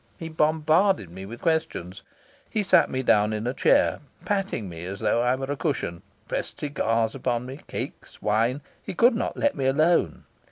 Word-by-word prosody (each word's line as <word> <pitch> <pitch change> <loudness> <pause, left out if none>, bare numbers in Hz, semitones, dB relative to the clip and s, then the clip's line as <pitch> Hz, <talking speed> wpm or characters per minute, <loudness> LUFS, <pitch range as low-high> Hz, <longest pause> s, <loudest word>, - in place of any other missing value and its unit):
He 165 - -6
bombarded 155 - +2
me 95 +2 -8
with 120 +3 -10
questions. 155 - -1 0.5
He 215 - 0
sat 190 - +4
me 130 0 -2
down 105 -2 +3
in 110 +1 -3
a 125 - -1
chair, - - +3 0.3
patting 195 - -1
me 85 -1 -8
as 95 +2 -6
though 120 - +2
I 125 +1 +2
were 135 +1 -4
a - - 0
cushion, 130 - -2 0.3
pressed - - -4
cigars 115 -6 0
upon 125 -2 -2
me, 130 +3 -8
cakes, - - -7
wine. 115 +6 +1 0.2
He - - -7
could 240 +7 +5
not 230 - -2
let 285 - +2
me 135 - -1
alone. 155 +6 +2
130 Hz, 185 wpm, -25 LUFS, 110-160 Hz, 0.5 s, could